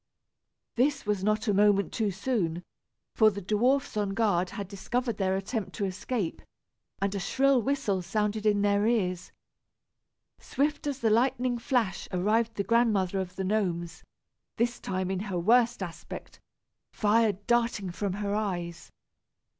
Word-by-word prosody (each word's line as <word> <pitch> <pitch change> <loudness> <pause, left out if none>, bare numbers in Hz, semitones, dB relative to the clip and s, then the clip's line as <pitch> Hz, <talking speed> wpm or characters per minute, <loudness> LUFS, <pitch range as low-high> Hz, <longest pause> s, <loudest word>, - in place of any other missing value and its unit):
This 275 +2 +1
was 205 -2 -1
not 215 +2 +1
a 205 - +3
moment 200 0 +3
too 220 -3 0
soon, 190 -4 -1 0.5
for 220 -1 +5
the 200 -1 -5
dwarfs 235 +9 +1
on 200 -2 -1
guard 185 -5 +1
had 200 0 -6
discovered 230 +4 -2
their 190 -1 +1
attempt 200 +2 -4
to 205 - -2
escape, 190 0 -3 0.6
and 195 0 0
a 200 - -2
shrill 265 +7 +2
whistle 225 -7 0
sounded 210 +3 -1
in 205 -1 +3
their 205 +1 +2
ears. 185 -6 0 1.1
Swift 290 +1 -1
as 275 -2 -3
the 225 -2 +3
lightning 245 +1 +2
flash 230 -5 0
arrived 220 +5 +1
the 200 - -1
Grandmother 200 -4 +2
of 185 -1 -5
the 190 - -3
Gnomes, 175 -5 -1 0.5
this 240 +1 0
time 185 -1 -2
in 190 - -1
her 195 -2 -3
worst 230 +4 +3
aspect, 170 -3 -9 0.5
fire 215 0 +3
darting 210 -1 0
from 195 +1 -2
her 200 0 -2
eyes. 175 -5 -3
205 Hz, 145 wpm, -28 LUFS, 190-230 Hz, 1.1 s, for